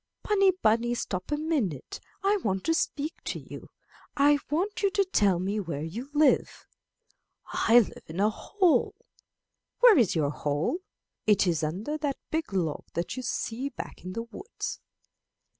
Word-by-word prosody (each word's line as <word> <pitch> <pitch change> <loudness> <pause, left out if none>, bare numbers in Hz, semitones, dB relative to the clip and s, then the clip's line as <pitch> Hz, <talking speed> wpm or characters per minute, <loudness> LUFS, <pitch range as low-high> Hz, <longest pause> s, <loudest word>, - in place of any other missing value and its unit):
'Bunny! 395 -2 +4
bunny! 235 +2 +3
stop 185 0 -4
a 295 - +1
minute; 275 - -2 0.2
I 405 +1 +3
want 195 - -2
to 325 - +2
speak 305 -1 -1
to - - -2
you. - - -11 0.5
I 290 +1 +5
want 400 +9 -1
you 400 - +3
to 395 0 +1
tell 205 - +3
me 195 +4 -1
where 165 -7 -4
you 225 - -6
live. 300 0 +2 0.8
I 235 +2 +5
live 215 - -7
in 160 - -8
my 210 +3 +3
hole. 370 - +1 0.9
Where 475 - +8
is 220 -8 +3
your 145 -3 +1
hole? 150 - -1 0.5
It 205 -2 +5
is 170 -3 +1
under 200 - -2
that 285 -3 -1
big 320 -5 -2
log 170 -6 -1
that 170 +1 -2
you 255 - -4
see 250 +2 -3
back 245 - -8
in 185 0 -6
the 230 +3 -3
woods.' 310 - -6
235 Hz, 160 wpm, -28 LUFS, -, 0.9 s, Where